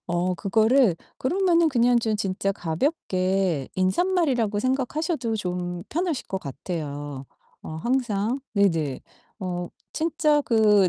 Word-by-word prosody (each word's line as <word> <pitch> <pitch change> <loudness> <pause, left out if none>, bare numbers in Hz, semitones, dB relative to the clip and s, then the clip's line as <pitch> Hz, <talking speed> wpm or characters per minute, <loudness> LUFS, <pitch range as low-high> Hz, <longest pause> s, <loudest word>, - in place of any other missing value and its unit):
어 180 +1 0
그거를 220 +2 +3 0.2
그러면은 340 +2 +3
그냥 245 -2 +4
좀 220 -2 0
진짜 195 0 -1
가볍게 185 - 0
인사말이라고 245 - +1
생각하셔도 260 - -1
좀 180 -3 -3
편하실 335 -4 -1
것 190 - -2
같아요. 145 -3 -5 0.4
어 - - -8
항상 240 +3 0
네네. 165 -9 +2 0.4
어 180 -1 -3 0.2
진짜 310 -2 +2
그 210 -6 +4
210 Hz, 245 characters per minute, -25 LUFS, 180-265 Hz, 0.4 s, 그냥